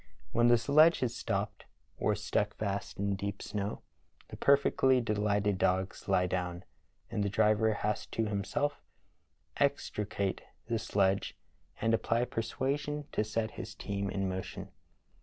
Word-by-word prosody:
When 120 Hz, 0 st, +4 dB
the 120 Hz, 0 st, +6 dB
sledge 155 Hz, +6 st, +5 dB
is 120 Hz, -2 st, -1 dB
stopped -, -, -3 dB, 0.3 s
or 105 Hz, -, +2 dB
stuck 105 Hz, 0 st, -1 dB
fast 100 Hz, -1 st, -3 dB
in 100 Hz, 0 st, 0 dB
deep 100 Hz, +1 st, -4 dB
snow, 105 Hz, 0 st, -4 dB, 0.5 s
the -, -, -8 dB
perfectly 135 Hz, -2 st, +4 dB
delighted 105 Hz, -3 st, +1 dB
dogs 95 Hz, +1 st, 0 dB
lie 90 Hz, -2 st, +4 dB
down, 90 Hz, 0 st, -2 dB, 0.5 s
and 105 Hz, -, -1 dB
the 100 Hz, -, 0 dB
driver 110 Hz, +1 st, +3 dB
has 105 Hz, 0 st, -2 dB
to 115 Hz, -, -1 dB
himself 125 Hz, +9 st, -1 dB, 0.8 s
extricate 100 Hz, -2 st, 0 dB, 0.2 s
the 115 Hz, -1 st, -1 dB
sledge 100 Hz, -3 st, +1 dB, 0.4 s
and 115 Hz, +1 st, +2 dB
apply 115 Hz, +1 st, +2 dB
persuasion 140 Hz, +6 st, -2 dB
to -, -, +1 dB
set 110 Hz, +1 st, -2 dB
his 110 Hz, -, -8 dB
team 100 Hz, -2 st, -3 dB
in 95 Hz, 0 st, -1 dB
mo 95 Hz, 0 st, -2 dB
tion. -, -, -8 dB
105 Hz, 140 wpm, -32 LUFS, 100-115 Hz, 0.8 s, the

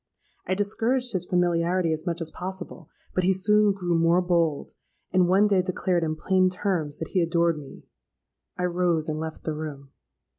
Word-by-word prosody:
I 185 Hz, -, +1 dB
discouraged 230 Hz, +5 st, 0 dB
his 180 Hz, -2 st, -1 dB
familiarity 175 Hz, -1 st, +1 dB
as 160 Hz, +1 st, -5 dB
much 170 Hz, 0 st, -2 dB
as 160 Hz, -1 st, -3 dB
possible; 180 Hz, -3 st, -7 dB, 0.2 s
but 185 Hz, -, 0 dB
he 190 Hz, +2 st, +3 dB
soon 210 Hz, +2 st, +3 dB
grew 180 Hz, -3 st, -2 dB
more 165 Hz, +1 st, +3 dB
bold, 170 Hz, -5 st, 0 dB, 0.4 s
and 180 Hz, -1 st, +4 dB
one 195 Hz, +3 st, +5 dB
day 200 Hz, -3 st, +3 dB
declared 180 Hz, -1 st, -1 dB
in 155 Hz, -1 st, -1 dB
plain 185 Hz, +3 st, +2 dB
terms 180 Hz, -6 st, -2 dB
that 165 Hz, -, -6 dB
he 185 Hz, -, +1 dB
adored 170 Hz, -1 st, +1 dB
me. 140 Hz, -, -12 dB, 0.7 s
I 180 Hz, -, -2 dB
rose 175 Hz, -3 st, 0 dB
and 155 Hz, -1 st, -2 dB
left 160 Hz, 0 st, -6 dB
the 155 Hz, -, -2 dB
room. 145 Hz, -3 st, -7 dB
175 Hz, 180 wpm, -25 LUFS, 160-185 Hz, 0.7 s, one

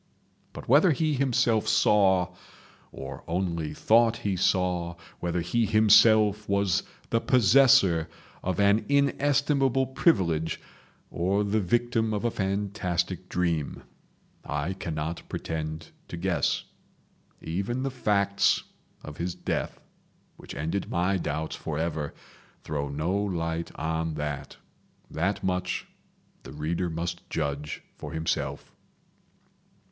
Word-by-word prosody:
But -, -, -10 dB
whether 145 Hz, +9 st, +6 dB
he 155 Hz, +1 st, +1 dB
himself 120 Hz, -5 st, +2 dB
saw, 95 Hz, -5 st, +3 dB, 0.6 s
or 65 Hz, -, -8 dB
only 85 Hz, -3 st, -2 dB
thought 115 Hz, +1 st, +4 dB
he 100 Hz, -2 st, +1 dB
saw, 90 Hz, -1 st, +1 dB, 0.2 s
whether 90 Hz, 0 st, -1 dB
he 110 Hz, +7 st, +1 dB
himself 110 Hz, 0 st, +5 dB
was 100 Hz, -3 st, +2 dB, 0.3 s
the 115 Hz, -, +2 dB
possessor 105 Hz, -, +5 dB, 0.3 s
of 95 Hz, 0 st, -2 dB
an 100 Hz, +2 st, +4 dB
inestimable 140 Hz, -1 st, +2 dB
privilege, 90 Hz, -, +1 dB, 0.5 s
or 95 Hz, +4 st, +1 dB
the 105 Hz, +2 st, +1 dB
victim 115 Hz, +2 st, +1 dB
of 105 Hz, -, -2 dB
a 120 Hz, -, +2 dB
fantastic 95 Hz, -3 st, -2 dB
dream, 85 Hz, -5 st, -1 dB, 0.6 s
I 75 Hz, +5 st, -2 dB
cannot 80 Hz, -3 st, -4 dB
pretend 80 Hz, 0 st, -5 dB, 0.2 s
to 85 Hz, -, -7 dB
guess. 85 Hz, -4 st, 0 dB, 0.8 s
Even 100 Hz, +10 st, -3 dB
the 135 Hz, -, -1 dB
facts 100 Hz, -5 st, +2 dB, 0.4 s
of 75 Hz, -, -9 dB
his 85 Hz, +1 st, -3 dB
death, -, -, -3 dB, 0.6 s
which -, -, -10 dB
ended 80 Hz, +8 st, -2 dB
my 90 Hz, +3 st, +1 dB
doubts 80 Hz, -2 st, -3 dB
forever, 80 Hz, -1 st, -3 dB, 0.5 s
throw 70 Hz, -2 st, -3 dB
no 75 Hz, +6 st, -1 dB
light 85 Hz, -5 st, -2 dB
on 80 Hz, 0 st, -2 dB
that. 75 Hz, -2 st, -5 dB, 0.5 s
That 95 Hz, +6 st, -1 dB
much 90 Hz, -1 st, -1 dB, 0.6 s
the -, -, -11 dB
reader 80 Hz, +4 st, -2 dB
must 85 Hz, +1 st, -4 dB
judge 75 Hz, -1 st, -3 dB
for -, -, -7 dB
himself. 80 Hz, 0 st, -3 dB
90 Hz, 110 wpm, -27 LUFS, 80-110 Hz, 0.8 s, whether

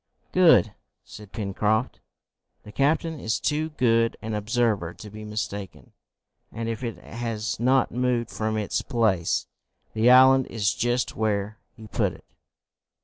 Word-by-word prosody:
"Good!" -, -, +5 dB, 0.3 s
said 105 Hz, -2 st, -13 dB
Pencroft. 110 Hz, +3 st, -1 dB, 0.6 s
"The 105 Hz, -, -11 dB
captain 155 Hz, +6 st, 0 dB
is 110 Hz, -3 st, -1 dB
too 155 Hz, +1 st, -1 dB
good 115 Hz, -6 st, +1 dB
an 110 Hz, 0 st, -4 dB
observer 105 Hz, -5 st, 0 dB
to 105 Hz, -, -10 dB
be 110 Hz, +1 st, -9 dB
mistaken, 105 Hz, -2 st, -6 dB, 0.6 s
and, 115 Hz, 0 st, -5 dB
if 115 Hz, +2 st, -4 dB
it 115 Hz, -6 st, -4 dB
has 115 Hz, +2 st, -4 dB
not 130 Hz, +3 st, +2 dB
moved 125 Hz, -1 st, -1 dB
from 110 Hz, 0 st, -2 dB
its 105 Hz, -2 st, -1 dB
place, 110 Hz, -, 0 dB, 0.5 s
the 110 Hz, +2 st, +3 dB
island 130 Hz, +1 st, +7 dB
is 105 Hz, -3 st, 0 dB
just 120 Hz, +1 st, -1 dB
where 105 Hz, 0 st, -1 dB, 0.2 s
he 110 Hz, -, -11 dB
put 105 Hz, -, -1 dB
it." -, -, -16 dB
115 Hz, 140 wpm, -25 LUFS, 105-125 Hz, 0.6 s, island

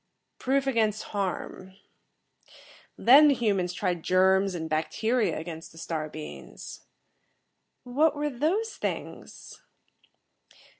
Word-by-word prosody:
"Proof 270 Hz, +1 st, +1 dB
against 220 Hz, -5 st, +1 dB
harm. 190 Hz, -1 st, -4 dB, 1.2 s
Then 280 Hz, +5 st, +7 dB
the 285 Hz, -, +4 dB
humans 200 Hz, -7 st, 0 dB
tried 180 Hz, -2 st, -2 dB
germs 190 Hz, +2 st, +3 dB
and 160 Hz, -2 st, -4 dB
bacteria 195 Hz, +6 st, 0 dB
against 165 Hz, 0 st, -7 dB
the 165 Hz, -, -17 dB
star 160 Hz, -2 st, -4 dB
beings." 155 Hz, 0 st, -9 dB, 1.0 s
"What 290 Hz, +6 st, +2 dB
were 295 Hz, 0 st, -2 dB
those 355 Hz, -, -1 dB
things?" -, -, -6 dB
200 Hz, 100 wpm, -27 LUFS, 175-260 Hz, 1.2 s, Then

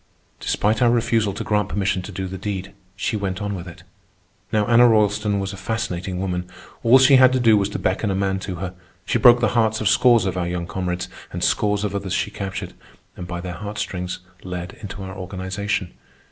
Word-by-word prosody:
Despite 105 Hz, +1 st, 0 dB
our 120 Hz, -, +5 dB
refusal 115 Hz, -3 st, +2 dB
to -, -, -4 dB
grant 105 Hz, -1 st, 0 dB
permission 100 Hz, -2 st, 0 dB
to 90 Hz, -, -8 dB
do 95 Hz, 0 st, -4 dB
the 95 Hz, 0 st, -6 dB
deed, 95 Hz, -1 st, -4 dB, 0.2 s
she 110 Hz, +2 st, -2 dB
went 95 Hz, -3 st, -2 dB
on 105 Hz, -1 st, -3 dB
with 90 Hz, -2 st, -6 dB
it. 85 Hz, -, -11 dB, 0.7 s
Now 105 Hz, -1 st, +2 dB
Anna 120 Hz, +2 st, +6 dB
Roylston 105 Hz, -2 st, +2 dB
was 95 Hz, 0 st, -3 dB
a -, -, -8 dB
fascinating 95 Hz, -4 st, -3 dB
woman. 90 Hz, -1 st, -3 dB, 0.3 s
All 120 Hz, +3 st, +7 dB
she 130 Hz, +1 st, +7 dB
had 130 Hz, -1 st, +7 dB
to 130 Hz, -, +2 dB
do 115 Hz, -3 st, +5 dB
was 100 Hz, -1 st, +1 dB
to -, -, -4 dB
beckon 95 Hz, +3 st, 0 dB
a 95 Hz, -, 0 dB
man 95 Hz, 0 st, 0 dB
to 95 Hz, -1 st, -5 dB
her. 90 Hz, +1 st, -5 dB, 0.3 s
She 120 Hz, -, +1 dB
broke 120 Hz, +1 st, +7 dB
the 120 Hz, -, +3 dB
hearts 110 Hz, -1 st, +1 dB
of 110 Hz, -, 0 dB
scores 120 Hz, +1 st, +5 dB
of 95 Hz, -1 st, -2 dB
our 90 Hz, -1 st, -1 dB
young 85 Hz, -1 st, -3 dB
comrades, 90 Hz, 0 st, -3 dB, 0.2 s
and -, -, -4 dB
scores 105 Hz, -1 st, +1 dB
of 105 Hz, -, -2 dB
others 100 Hz, -2 st, -3 dB
she -, -, -1 dB
captured, 95 Hz, -1 st, -5 dB, 0.4 s
and 90 Hz, -, -7 dB
by 85 Hz, -1 st, -4 dB
their 90 Hz, 0 st, -5 dB
heart 105 Hz, +4 st, -7 dB
strings 90 Hz, -2 st, -4 dB, 0.2 s
led 90 Hz, -1 st, -5 dB
into 100 Hz, -2 st, -7 dB
our 95 Hz, 0 st, -7 dB
organization. 95 Hz, +1 st, -3 dB
100 Hz, 215 wpm, -22 LUFS, 95-110 Hz, 0.7 s, All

